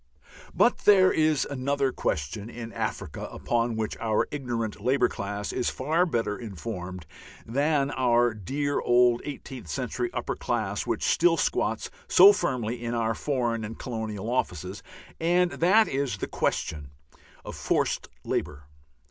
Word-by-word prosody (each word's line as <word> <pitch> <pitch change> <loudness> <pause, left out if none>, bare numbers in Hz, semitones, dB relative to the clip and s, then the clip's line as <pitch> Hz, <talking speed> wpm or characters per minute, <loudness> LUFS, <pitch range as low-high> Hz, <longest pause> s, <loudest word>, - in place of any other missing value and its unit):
But 240 - +4
there 190 -2 +6
is 155 -2 +2
another 140 0 0
question 90 +8 -3
in 115 -1 -8
Africa - - -4
upon 120 -1 -1
which 110 -1 -2
our 110 -2 +1
"ignorant" 115 -7 -3
Labour 130 +5 +3
class 100 +1 -4
is 125 - 0
far 160 +7 +1
better 115 -8 -1
informed 95 -5 -6 0.4
than 140 +3 +1
our 120 -3 +3
dear 140 +8 -2
old 120 0 +4
eighteenth 135 -3 -7
century 140 - -2
upper - - -3
class - - -2
which - - -1
still 350 - +3
squats - - 0 0.2
so 195 +3 +8
firmly 125 - -2
in 120 0 -2
our 115 -1 +1
Foreign 120 -4 -1
and 110 +1 -6
Colonial 110 -4 -4
Offices, 95 -5 -2 0.4
and 175 +2 +2
that 205 +6 +4
is 135 -5 -1
the - - -3
question 75 -3 -2 0.6
of - - -6
forced - - 0 0.2
labour. 75 0 -3
120 Hz, 140 wpm, -27 LUFS, 110-140 Hz, 0.6 s, so